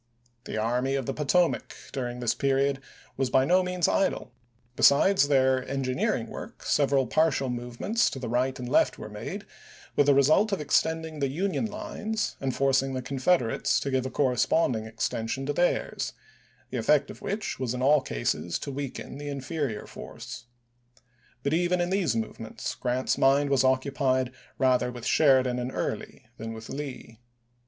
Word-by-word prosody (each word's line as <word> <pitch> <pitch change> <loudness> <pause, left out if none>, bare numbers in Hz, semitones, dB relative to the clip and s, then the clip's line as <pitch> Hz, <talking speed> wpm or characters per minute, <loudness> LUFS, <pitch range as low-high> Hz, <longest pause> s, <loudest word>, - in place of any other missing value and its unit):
The - - -4
Army 125 +5 0
of 135 -2 -2
the 135 - -2
Potomac 160 +4 +1 0.2
during 125 -2 -4
this 120 -1 +1
period 135 0 +1 0.4
was 135 -2 0
by 130 +1 +4
no 180 +5 +4
means 180 -2 0
idle; 190 - 0 0.4
besides 145 +5 +5
their 130 -2 +3
engineering 130 -2 0
work, - - -9
several 140 -2 +2
partial 140 0 +1
movements 125 - 0
to 135 - -6
right 125 +3 0
and 125 - -6
left - - +3
were 105 - -8
made, 180 - -6 0.5
with 145 - +3
the 140 - +6
result 155 +10 +4
of 195 - 0
extending 155 +3 0
the 140 - +1
Union 190 - -1
lines, 215 +1 -3
and 135 -2 -1
forcing 135 0 +2
the 130 - -3
Confederates 135 -1 +1
to 140 - -2
give 130 -1 +1
a - - -5
corresponding 125 -3 +1
extension 115 +3 -3
to 145 - -1
theirs; 175 +3 0 0.6
the 130 - -2
effect 140 +5 +2
of - - -13
which 205 +1 -3
was 125 -2 -2
in 125 - -3
all 145 +1 +5
cases 85 - -2
to 140 - -6
weaken 140 0 -6
the 145 0 -5
inferior 140 -4 -3
force. 115 - -9 1.0
But 140 - 0
even 175 +2 +2
in 175 +1 0
those 190 -10 +1
move 110 -1 -3
ments, 110 -1 -5
Grant's 125 +1 -1
mind 140 +1 +4
was 135 -2 +4
occupied 130 -1 +1 0.3
rather 125 -1 +2
with 120 -2 -8
Sheridan 130 -4 +4
and 125 +1 -3
Early - - -4
than 115 +1 -6
with 110 0 -9
Lee. 135 -5 -7
135 Hz, 165 wpm, -27 LUFS, 125-150 Hz, 1.0 s, the